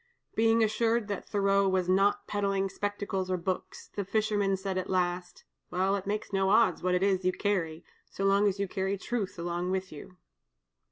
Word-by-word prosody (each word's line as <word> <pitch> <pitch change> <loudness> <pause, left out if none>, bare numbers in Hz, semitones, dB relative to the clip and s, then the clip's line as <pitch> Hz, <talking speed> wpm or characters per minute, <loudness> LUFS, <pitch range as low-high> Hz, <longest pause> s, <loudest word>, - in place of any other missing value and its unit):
Being 225 0 +3
assured 225 +1 +1
that 200 - -4
Thoreau 200 -1 +3
was 185 -1 +1
not 195 +2 +3
peddling 195 -1 0
spectacles 200 -1 -3
or 185 - +1
books, 180 +1 -4
the 200 - -1
fisherman 205 -1 +1
said 190 0 -3
at 185 - -5
last: 180 -1 -1 0.3
"Well, 190 +2 +1
it 195 -1 -5
makes 205 0 -3
no 195 0 +2
odds 215 -3 +4
what 180 0 +1
it 180 - +1
is 190 -2 +2
you 185 - +3
carry, 180 -5 -2 0.2
so 195 - -3
long 200 +1 +4
as 200 0 -1
you 200 - 0
carry 190 +1 -2
Truth 215 -1 -3
along 175 +1 -2
with 190 0 -2
you." 155 +4 -11
195 Hz, 185 wpm, -29 LUFS, 185-205 Hz, 0.3 s, odds